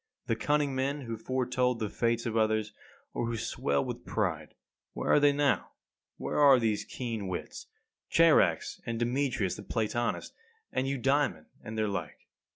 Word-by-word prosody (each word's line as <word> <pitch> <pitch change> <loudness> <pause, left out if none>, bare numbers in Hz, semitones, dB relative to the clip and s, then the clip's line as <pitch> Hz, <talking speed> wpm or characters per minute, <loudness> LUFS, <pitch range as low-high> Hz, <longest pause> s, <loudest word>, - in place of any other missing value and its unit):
The 115 - 0
cunning 145 +3 +1
men 135 +2 -1
who 115 -3 -4
foretold 125 0 0
the 110 - -2
fates 115 +2 0
of 115 -2 -2
others, 110 -1 +1 0.4
or 120 - -1
who 115 -1 -2
swelled 70 -9 -1
with - - -5
pride - - -2 0.4
where - - -1
are - - +6
they 145 0 +5
now? 140 -2 +1 0.4
Where - - -2
are 140 -3 +8
these 110 -3 0
keen 115 -6 -4
wits, 90 -1 -6 0.4
Charax, - - +4
and 115 -1 -3
Demetrius 120 -4 0
the - - -7
Platonist, 115 +3 -2 0.4
and 130 - 0
Eudaemon, 135 - +1 0.2
and 110 +1 -6
their 110 -1 +1
like? 85 -7 -5
120 Hz, 160 wpm, -30 LUFS, 110-135 Hz, 0.4 s, are